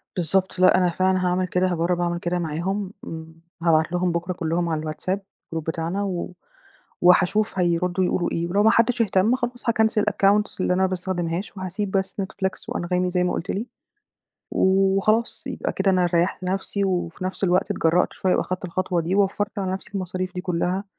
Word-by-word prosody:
بالضبط، 185 +2 0
لأ 185 - +6
أنا 180 -1 +3
فعلًا 185 +1 +1
هاعمل 180 +1 +1
كده، 180 +2 +1
هاجرّب 175 0 0
اعمل 175 0 -1
كده 175 +1 -1
معاهم، 180 +5 -2
م 160 0 -6 0.4
هابعت 160 -1 +3
لهم 180 0 +1
بُكرة 175 +2 -2
كلّهم 170 0 -1
على 155 -1 -1
الWhatsApp 185 +5 -2 0.4
group - - 0
بتاعنا 165 +5 -2
و 180 -2 -3 0.7
وهاشوف 190 +3 +3
هيردّوا 180 +1 +1
يقولوا 180 0 0
إيه، 170 +1 -1
ولو 200 +4 +2
ما 220 - +6
حدّش 235 +1 +3
اهتم، 210 +3 +3
خلاص 245 -1 -3
هاكنسل 220 -1 +2
الaccounts 205 0 +2
اللي 180 - +2
أنا 185 - +1
ما - - +4
باستخدمهاش 185 +1 -3
وهاسِيب 190 +2 -3
بس 190 0 -1
Netflix 190 0 -4
وAnghami 180 +1 0
زي 180 0 +1
ما 180 - 0
قُلت 180 - -4
لي 220 +5 -3 0.8
وخلاص، 195 +4 +2
يبقى - - -3
كده 195 0 +1
أنا 180 -1 +3
ريّحت 175 +2 +1
نفْسي 195 +2 -1
وفي 180 -1 -2
نفْس 190 +1 -2
الوقت 180 0 +2
اتجرّأت 165 +2 +2
شوية 185 - +1
وأخدت 185 +1 -2
الخطوة 180 0 -1
دي 170 +4 -1
ووفّرت 205 +1 0
على 190 -1 -1
نفْسي 195 +2 -6
المصاريف 185 -1 -3
دي 180 - -3
كلّها 180 +2 -1
185 Hz, 180 wpm, -23 LUFS, 175-195 Hz, 0.8 s, لأ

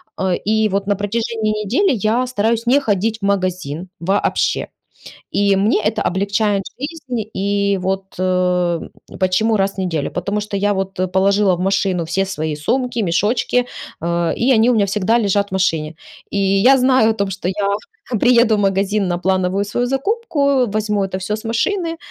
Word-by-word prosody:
а, 190 -1 0
и 220 +2 +1
вот 195 0 -1
на 205 - +2
протяжении 215 +2 -2
недели 305 - +2
я 225 +3 +1
стараюсь 230 -1 0
не 265 +4 +5
ходить 220 -3 0
в - - -16
магазин 185 -4 -2
вообще. 195 +4 0 0.7
И 200 -1 +2
мне 210 +2 +2
это 215 +1 0
облегчает 200 +1 0 0.2
жизнь. 265 -6 -5
И 200 0 0
вот, 190 +1 -3
э, 180 -2 +1 0.4
почему 215 +4 +2
раз 195 0 0
в - - -23
неделю? 170 -6 -2
Потому 200 +4 -2
что 210 -1 -4
я, 205 +1 +1
вот, 195 -1 -3 0.2
положила 195 0 +3
в - - -7
машину 190 -2 0
все 175 +4 0
свои 155 -5 -3
сумки, 240 - -1
мешочки, 215 +6 +1 0.3
а, 170 +1 0
и 255 +3 +2
они 230 0 +4
у 245 - +3
меня 205 -2 +2
всегда 210 +4 +1
лежат 200 -2 +1
в - - -20
машине. 165 -5 0 0.3
И - - -4
я 195 +7 +4
знаю 255 -3 +4
о - - 0
том, 200 -2 -1
что 185 -1 -4
я 200 +1 0 0.5
приеду 235 -3 +4
в - - -1
магазин 195 0 +1
на 175 -1 -1
плановую 190 +1 0
свою 240 +4 -1
закупку, 280 - +1
возьму 210 -1 0
это 190 0 -4
всё 190 - -4
с 215 - -10
машины, 330 - -1
200 Hz, 175 wpm, -18 LUFS, 190-225 Hz, 0.7 s, не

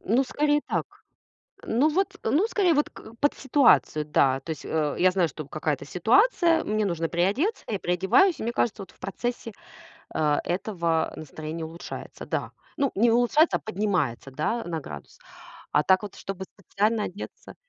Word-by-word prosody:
Ну, 245 +7 +2
скорее 295 +2 +1
так. - - -1 0.8
Ну 255 +8 +2
вот, 385 +5 0
ну 305 - +2
скорее, 375 -7 +2
вот 295 0 +1
к 225 - -13
под 290 - +3
ситуацию, 260 - +3
да. 135 -3 +2
То 160 - -6
есть, 155 - -7
э, 150 -2 -1
я 185 +1 +5
знаю, 180 -2 +2
что 155 0 -8
какая-то 155 -3 -2
ситуация, 330 - +3
мне 215 0 0
нужно 165 -3 -1
приодеться, 205 - 0
я 205 -3 -2
приодеваюсь, 190 - +3
и - - -4
мне 235 +1 -2
кажется, 220 -4 0
вот - - -14
в - - -28
процессе, 240 +3 -4 0.6
э, 150 -2 +2
этого 170 -3 -1
настроение 155 +2 -6
улучшается. 165 +2 -8
Да. - - -3 0.3
Ну, 275 -2 +1
не 230 +4 +4
улучшается, 245 +7 +3
а - - -19
поднимается, 180 - -1
да, 155 - -2
на 165 -2 -3
градус. 75 - -10 0.5
А 150 - +4
так 185 +5 +4
вот, 205 -1 -7
чтобы 190 -1 -6
специально 210 +3 -1
одеться 200 +3 -8
200 Hz, 170 wpm, -26 LUFS, 165-255 Hz, 0.8 s, я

